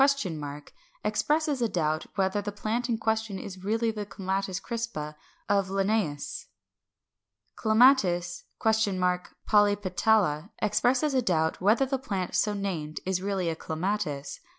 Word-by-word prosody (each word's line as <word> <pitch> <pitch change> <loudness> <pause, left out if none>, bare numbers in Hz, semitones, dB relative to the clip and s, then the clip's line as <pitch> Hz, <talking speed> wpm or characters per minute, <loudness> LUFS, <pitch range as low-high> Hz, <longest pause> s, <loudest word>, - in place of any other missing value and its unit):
expresses 295 +6 +1
a 230 - +2
doubt 155 -3 0
whether 195 +1 +1
the 205 +1 -4
plant 225 +4 -2
in 230 - +1
question 220 -2 -1
is 190 -1 -8
really 225 +3 +1
the 210 -1 -4
Clematis 195 -2 -2
crispa 230 -11 -4 0.3
of 200 -2 +2
Linnæus. 195 -6 -1 1.1
Clematis? 215 -7 +3
polypetala 205 -2 +2
expresses 250 +7 +2
a 260 - +3
doubt 160 -7 0
whether 215 +8 +4
the 265 0 -1
plant 195 -8 -3
so 210 - +2
named 170 -7 -3
is 185 -1 0
really 195 -2 -1
a 165 - 0
Clematis. 160 -4 -3
200 Hz, 120 wpm, -28 LUFS, 180-220 Hz, 1.1 s, whether